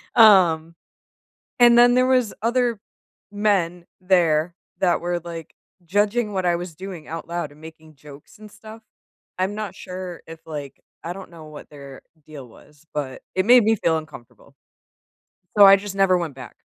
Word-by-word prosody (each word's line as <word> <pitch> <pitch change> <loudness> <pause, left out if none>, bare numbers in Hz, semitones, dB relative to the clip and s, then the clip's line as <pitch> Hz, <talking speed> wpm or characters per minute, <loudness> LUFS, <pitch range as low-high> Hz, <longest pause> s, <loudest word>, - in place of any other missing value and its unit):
um, 170 -7 +5 0.8
and 240 -1 +6
then 245 0 +6
there 255 0 +3
was 255 -4 +1
other 240 -1 0 0.5
men 185 -5 -1 0.2
there 170 -3 +2 0.3
that 180 -2 +2
were, 175 0 -2
like, 165 -2 -9 0.3
judging 210 +4 0
what 190 -2 -2
I 175 -1 +2
was 175 -1 -7
doing 185 -2 -9
out 165 +1 -7
loud 170 -3 -5
and 150 - -19
making 160 0 -14
jokes 145 +3 -16
and 215 0 -13
stuff. 220 +2 -13 0.6
I'm 190 +2 -1
not 210 -3 -6
sure 180 -1 -8
if, 160 0 -11
like 145 -3 -8 0.3
I 175 - -3
don't 190 0 -11
know 160 -2 -13
what 150 -1 -12
their 140 -2 -12 0.3
deal 145 -5 -11
was, 150 +6 -21
but 140 -3 -5
it 185 - +1
made 245 +3 +6
me 220 0 +2
feel 165 -3 0
uncomfortable 150 -6 -13 1.0
so 200 - +9
I 195 - +9
just 195 0 -6
never 195 -2 +3
went 165 -6 -5
back. 130 -4 -11
175 Hz, 170 wpm, -22 LUFS, 160-205 Hz, 1.0 s, so